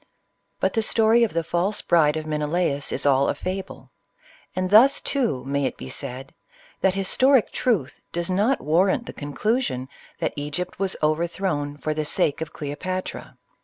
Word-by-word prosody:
But -, -, +1 dB
the 225 Hz, -, +1 dB
story 225 Hz, +1 st, +3 dB
of 230 Hz, -, +1 dB
the 165 Hz, -, +1 dB
false 175 Hz, +5 st, -1 dB
bride 160 Hz, -3 st, +3 dB
of 155 Hz, -, -4 dB
Menelaiis 150 Hz, -1 st, 0 dB
is 140 Hz, -, -1 dB
all 140 Hz, -1 st, +4 dB
a -, -, 0 dB
fable; 185 Hz, +1 st, -6 dB, 0.6 s
and 185 Hz, 0 st, -1 dB
thus, 250 Hz, +7 st, +7 dB
too, 240 Hz, -, -1 dB
may 140 Hz, 0 st, 0 dB
it -, -, -6 dB
be 65 Hz, -, -8 dB
said, 130 Hz, +2 st, -5 dB, 0.5 s
that 190 Hz, -1 st, +2 dB
historic 255 Hz, +6 st, +3 dB
truth 190 Hz, -, -1 dB
does 170 Hz, 0 st, -2 dB
not 210 Hz, +8 st, +1 dB
warrant 185 Hz, +9 st, +2 dB
the -, -, -8 dB
conclusion, 145 Hz, -, -2 dB, 0.3 s
that -, -, -2 dB
Egypt 150 Hz, +6 st, -4 dB
was 195 Hz, -1 st, 0 dB
over 155 Hz, +3 st, +2 dB
thrown, 150 Hz, -6 st, -3 dB
for 155 Hz, +1 st, -2 dB
the 155 Hz, 0 st, -2 dB
sake 150 Hz, 0 st, +1 dB
of 160 Hz, -, -4 dB
Cleopatra. 185 Hz, +5 st, -5 dB
170 Hz, 165 wpm, -24 LUFS, 145-195 Hz, 0.6 s, thus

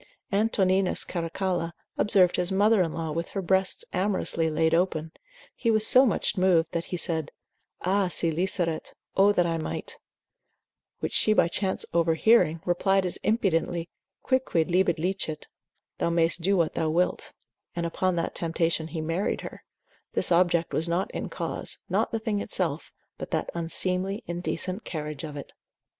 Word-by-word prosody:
Antoninus 195 Hz, -3 st, +2 dB
Caracalla 170 Hz, 0 st, -2 dB, 0.2 s
observed 190 Hz, -4 st, +3 dB
his 180 Hz, +1 st, 0 dB
mother 205 Hz, +2 st, +4 dB
in 165 Hz, -3 st, 0 dB
law 160 Hz, -1 st, -4 dB
with 165 Hz, +2 st, -3 dB
her -, -, 0 dB
breasts 190 Hz, +1 st, +1 dB
amorously 185 Hz, -4 st, 0 dB
laid 160 Hz, +1 st, +1 dB
open, 165 Hz, -2 st, 0 dB, 0.4 s
he 230 Hz, -, -1 dB
was 215 Hz, -1 st, +4 dB
so 255 Hz, +4 st, +7 dB
much 210 Hz, -, 0 dB
moved, 175 Hz, -3 st, +3 dB
that 170 Hz, 0 st, -2 dB
he 180 Hz, -, -4 dB
said, 160 Hz, -3 st, -1 dB, 0.5 s
Ah 195 Hz, +1 st, +1 dB
si 170 Hz, -1 st, +2 dB
liceret, 170 Hz, -1 st, -1 dB, 0.2 s
O 200 Hz, +1 st, +5 dB
that 180 Hz, -4 st, +2 dB
I 165 Hz, -1 st, -1 dB
might; 155 Hz, -, -5 dB, 1.0 s
which -, -, -3 dB
she 215 Hz, -, +4 dB
by 190 Hz, -, +4 dB
chance 190 Hz, +2 st, -2 dB
overhearing, 165 Hz, +1 st, +3 dB
replied 190 Hz, +2 st, +2 dB
as 180 Hz, -, -2 dB
impudently, 175 Hz, -5 st, 0 dB, 0.3 s
Quicquid 255 Hz, -, +1 dB
libet 180 Hz, -1 st, +2 dB
licet, 160 Hz, -3 st, -3 dB, 0.5 s
thou -, -, +1 dB
mayst 170 Hz, 0 st, +2 dB
do 195 Hz, +3 st, +2 dB
what 165 Hz, -2 st, +1 dB
thou 160 Hz, -1 st, 0 dB
wilt: 175 Hz, +3 st, 0 dB, 0.4 s
and 170 Hz, 0 st, -2 dB
upon 185 Hz, +2 st, 0 dB
that 170 Hz, -, -2 dB
temptation 165 Hz, -1 st, -1 dB
he 160 Hz, -1 st, -5 dB
married 165 Hz, +5 st, -1 dB
her: -, -, -9 dB, 0.5 s
this -, -, +1 dB
object 170 Hz, -1 st, +2 dB
was 165 Hz, +2 st, +1 dB
not 175 Hz, +3 st, -1 dB
in -, -, -4 dB
cause, -, -, -3 dB
not -, -, +1 dB
the 225 Hz, -, 0 dB
thing 220 Hz, -2 st, -2 dB
itself, 165 Hz, -7 st, -2 dB, 0.3 s
but -, -, -6 dB
that -, -, -2 dB
unseemly, 185 Hz, +5 st, -1 dB
indecent 180 Hz, +3 st, -3 dB
carriage 150 Hz, -3 st, -5 dB
of 150 Hz, -2 st, -6 dB
it. 140 Hz, -, -9 dB
175 Hz, 160 wpm, -27 LUFS, 165-190 Hz, 1.0 s, so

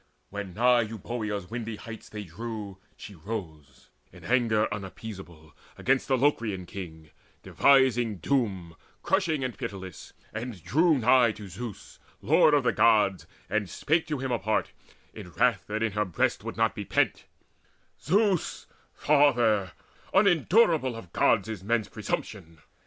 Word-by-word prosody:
When 100 Hz, -3 st, -6 dB
nigh 120 Hz, +1 st, +4 dB
Euboea's 105 Hz, -3 st, -5 dB
windy 115 Hz, -2 st, -4 dB
heights 115 Hz, +1 st, -10 dB
they 105 Hz, -1 st, -6 dB
drew, 105 Hz, +1 st, -7 dB, 0.2 s
She 105 Hz, -, -10 dB
rose, 80 Hz, -, -8 dB, 0.2 s
in -, -, -15 dB
anger 115 Hz, -3 st, +2 dB
unappeasable 95 Hz, -5 st, -9 dB, 0.2 s
Against 135 Hz, +1 st, +1 dB
the 130 Hz, -, +2 dB
Locrian 115 Hz, -9 st, 0 dB
king, 80 Hz, -4 st, -9 dB, 0.3 s
devising 125 Hz, -6 st, +3 dB
doom 95 Hz, -, -1 dB, 0.3 s
Crushing 170 Hz, -8 st, +1 dB
and 130 Hz, -4 st, -3 dB
pitiless, 95 Hz, -4 st, -8 dB, 0.2 s
and 115 Hz, -5 st, -6 dB
drew 160 Hz, +1 st, +3 dB
nigh 125 Hz, -1 st, +4 dB
to 105 Hz, -2 st, -10 dB
Zeus 100 Hz, +3 st, -9 dB, 0.2 s
Lord 150 Hz, -, +4 dB
of 145 Hz, -, +2 dB
the -, -, +2 dB
Gods, 105 Hz, -4 st, +3 dB, 0.2 s
and 105 Hz, -2 st, -1 dB
spake 160 Hz, +2 st, 0 dB
to 150 Hz, -2 st, -2 dB
him 130 Hz, 0 st, -3 dB
apart 110 Hz, -2 st, 0 dB, 0.4 s
In 90 Hz, -, -10 dB
wrath 115 Hz, -6 st, +1 dB
that 110 Hz, +1 st, -2 dB
in 115 Hz, -, 0 dB
her 105 Hz, +1 st, 0 dB
breast 90 Hz, -, -1 dB
would -, -, -6 dB
not -, -, +2 dB
be -, -, -5 dB
pent: -, -, 0 dB, 0.8 s
"Zeus, 195 Hz, +1 st, +1 dB, 0.3 s
Father, 120 Hz, -, +3 dB, 0.4 s
unendurable 175 Hz, -, +3 dB
of 95 Hz, -7 st, -11 dB
Gods -, -, +2 dB
Is 110 Hz, -4 st, -6 dB
men's 110 Hz, 0 st, 0 dB
presumption! 80 Hz, 0 st, -5 dB
110 Hz, 140 wpm, -27 LUFS, 95-130 Hz, 0.8 s, nigh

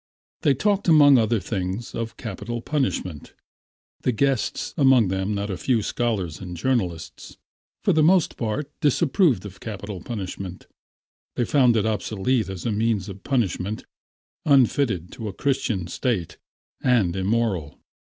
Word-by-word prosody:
They 140 Hz, -, +3 dB
talked 200 Hz, -, +1 dB
among 145 Hz, -5 st, +7 dB
other 115 Hz, 0 st, +2 dB
things 95 Hz, +2 st, -4 dB
of 115 Hz, 0 st, -4 dB
capital 115 Hz, +2 st, -5 dB
punishment. 115 Hz, -, -2 dB, 0.7 s
The 125 Hz, -, +1 dB
guests, 130 Hz, 0 st, 0 dB
among 130 Hz, -, +5 dB
them 95 Hz, +2 st, -1 dB
not 100 Hz, +1 st, -2 dB
a 95 Hz, -, -3 dB
few 115 Hz, -1 st, +1 dB
scholars 105 Hz, -9 st, -2 dB
and 90 Hz, -2 st, -7 dB
journalists, 85 Hz, -, -2 dB, 0.5 s
for -, -, +3 dB
the 155 Hz, -, +3 dB
most 170 Hz, +2 st, +4 dB
part 130 Hz, +6 st, -3 dB
disapproved 145 Hz, -, +2 dB
of 100 Hz, -1 st, -9 dB
capital 100 Hz, -3 st, -6 dB
punishment. 95 Hz, -4 st, -6 dB, 0.7 s
They 120 Hz, -, +1 dB
found 125 Hz, -5 st, +4 dB
it 105 Hz, -, +1 dB
obsolete 110 Hz, +1 st, 0 dB
as 95 Hz, -2 st, -6 dB
a 115 Hz, -, +1 dB
means 105 Hz, -2 st, 0 dB
of 95 Hz, 0 st, -9 dB
punishment, 110 Hz, -5 st, -1 dB, 0.6 s
unfitted 130 Hz, -, +2 dB
to 110 Hz, -, -6 dB
a 100 Hz, -, -5 dB
Christian 130 Hz, -7 st, -1 dB
State 90 Hz, -, -2 dB, 0.4 s
and 110 Hz, -9 st, +2 dB
immoral. 95 Hz, -6 st, -1 dB
110 Hz, 140 wpm, -24 LUFS, 95-130 Hz, 0.7 s, among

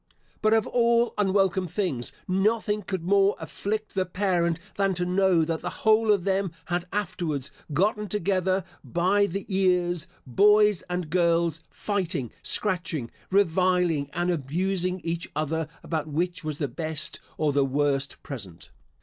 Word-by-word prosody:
But 215 Hz, 0 st, +4 dB
of 220 Hz, -, +2 dB
all 235 Hz, 0 st, +2 dB
unwelcome 195 Hz, -2 st, +2 dB
things, 160 Hz, -, -2 dB, 0.2 s
nothing 210 Hz, +3 st, +1 dB
could 190 Hz, -4 st, -4 dB
more 200 Hz, +2 st, +3 dB
afflict 215 Hz, +1 st, -4 dB
the 190 Hz, -, +1 dB
parent 180 Hz, -3 st, +1 dB, 0.2 s
than 195 Hz, -1 st, +1 dB
to 180 Hz, +1 st, -1 dB
know, 180 Hz, -2 st, +3 dB
that 165 Hz, 0 st, -2 dB
the -, -, -3 dB, 0.2 s
whole 220 Hz, 0 st, +5 dB
of 200 Hz, -4 st, +2 dB
them 195 Hz, -1 st, 0 dB
had 175 Hz, 0 st, -2 dB
afterwards 170 Hz, -8 st, -2 dB, 0.2 s
gotten 210 Hz, +7 st, +1 dB
together 190 Hz, -1 st, 0 dB, 0.2 s
by 190 Hz, +4 st, +2 dB
the 195 Hz, +1 st, -4 dB
ears, 180 Hz, -3 st, +1 dB, 0.2 s
boys 210 Hz, -, +4 dB
and 180 Hz, -3 st, -3 dB
girls, 170 Hz, -2 st, +2 dB
fighting, 175 Hz, -, -2 dB
scratching, 170 Hz, -, 0 dB, 0.2 s
reviling, 180 Hz, -5 st, +2 dB
and 175 Hz, +1 st, 0 dB
abusing 180 Hz, +4 st, -1 dB
each 170 Hz, 0 st, -3 dB
other 155 Hz, +1 st, -1 dB, 0.2 s
about 155 Hz, -2 st, -2 dB
which 175 Hz, +4 st, -2 dB
was 155 Hz, -2 st, -3 dB
the 145 Hz, -, -1 dB
best 155 Hz, +2 st, -2 dB, 0.2 s
or 150 Hz, -2 st, +1 dB
the 140 Hz, 0 st, +3 dB
worst 140 Hz, 0 st, -1 dB
present. 95 Hz, -, -8 dB
180 Hz, 140 wpm, -26 LUFS, 160-195 Hz, 0.2 s, whole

